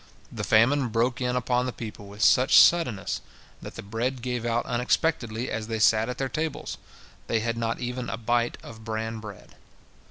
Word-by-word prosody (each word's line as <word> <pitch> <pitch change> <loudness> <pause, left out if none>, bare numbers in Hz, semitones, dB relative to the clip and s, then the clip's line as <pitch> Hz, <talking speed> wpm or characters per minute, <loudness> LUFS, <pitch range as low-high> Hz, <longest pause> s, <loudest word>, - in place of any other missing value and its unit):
The - - -5
famine 130 +5 +4
broke 120 +3 0
in 125 0 0
upon 125 0 0
the - - -2
people 105 -4 -8
with 100 +2 -5
such 130 +3 +5
suddenness 120 - +4 0.4
that - - -9
the - - -7
bread 120 +5 -3
gave 125 -2 -2
out 120 +1 0
unexpectedly 125 -1 0
as 110 0 -3
they 115 -1 -2
sat 110 +1 +3
at 125 - -4
their 135 - -1
tables, 155 +2 -4 0.5
they 115 -1 +1
had 115 +1 -1
not 115 0 -2
even 125 -1 -4
a 105 - -3
bite 120 +1 0
of 110 -1 -11
bran 110 0 -3
bread. 105 -3 -11
120 Hz, 185 wpm, -26 LUFS, 110-125 Hz, 0.5 s, such